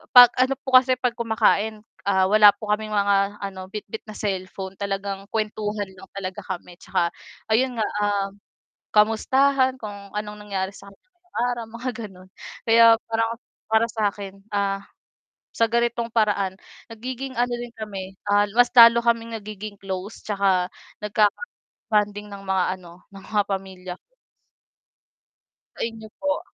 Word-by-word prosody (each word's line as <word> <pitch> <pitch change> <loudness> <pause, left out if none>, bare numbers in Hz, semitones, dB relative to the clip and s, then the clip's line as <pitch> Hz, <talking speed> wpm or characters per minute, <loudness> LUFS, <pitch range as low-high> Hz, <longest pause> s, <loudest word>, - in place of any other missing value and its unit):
pag 245 -1 +11
ano 260 +1 +3
po 265 - -5
kasi 255 0 +1
'pag 250 -1 0
kumakain 220 -1 +1 0.2
wala 200 +2 +6
po 210 0 -4
kaming 215 0 -1
mga 200 0 +2
ano 190 -1 -6
bitbit 210 +2 -7
na 215 - -9
cellphone 190 -1 -4
talagang 195 0 -3
kuwentuhan 210 -2 -2
lang 190 - -14
talaga 190 0 -5
kami 175 -1 -7
tsaka, 170 -1 0 0.4
ayun 250 +3 +2
nga 215 - +1 1.1
kamustahan 260 +5 +3
kung 200 -2 -8
anong 210 0 -4
nangyari 190 -1 -2
sa 200 - -13
kanila 195 - -25
ngayong 360 0 -14 0.2
araw 235 -1 -6
mga 255 +2 -3 0.2
ganon 185 -1 -16 0.4
kaya 230 0 +7 0.2
parang 225 0 +1 0.4
para 220 +1 +5
sakin, 205 -3 -2 0.2
ah, 195 0 0 0.7
sa 230 - +3
ganitong 235 0 +1
paraan 205 -4 +1 0.4
nagiging 255 +3 -6
ano 245 0 +1
din 240 0 -7
kami 195 -3 -7
ah 205 0 +4
mas 245 0 +6
lalo 235 0 +9
kaming 230 -1 +1
nagiging 210 0 -8
close 190 +2 -5
tsaka 195 -3 +1 0.4
nagkaka-bonding 210 - -1
ng 200 0 -9
mga 190 -1 +1
ano 175 0 -15
ng 195 0 -11
mga 210 -1 +3
pamilya. 190 -2 -5 1.8
Sa - - -8
inyo 225 -1 -5
po 290 0 0
210 Hz, 140 wpm, -24 LUFS, 195-230 Hz, 1.8 s, pag